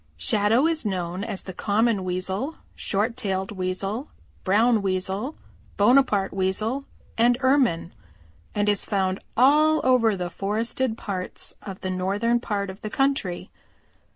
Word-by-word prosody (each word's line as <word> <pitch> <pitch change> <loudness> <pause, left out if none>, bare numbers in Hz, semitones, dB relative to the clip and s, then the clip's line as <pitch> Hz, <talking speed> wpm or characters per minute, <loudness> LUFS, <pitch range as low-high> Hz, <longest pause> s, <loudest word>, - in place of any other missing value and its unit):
"Shadow 210 - +2
is 325 -1 +1
known 185 -2 -2
as 195 - -5
the 190 - -7
Common 210 +1 +1
Weasel, 190 - -2 0.2
Short 220 +4 -1
tailed 195 -5 -2
Weasel, 195 +6 -3 0.3
Brown 220 +3 +3
Weasel, 195 +7 -2 0.4
Bonaparte 210 -3 +4
Weasel 215 +8 -1 0.3
and 240 +1 +4
Ermine, 255 -11 +2 0.6
and 205 0 +1
is 205 -1 +2
found 190 -2 0 0.2
all 305 +5 +5
over 245 -5 +4
the 180 -1 -4
forested 220 +5 -1
parts 185 -5 -4
of 195 -2 -8
the 185 - -2
northern 200 +6 +1
part 200 -4 -2
of 190 - -14
the 215 - -4
country. 270 -8 -1
205 Hz, 130 wpm, -25 LUFS, 190-240 Hz, 0.6 s, all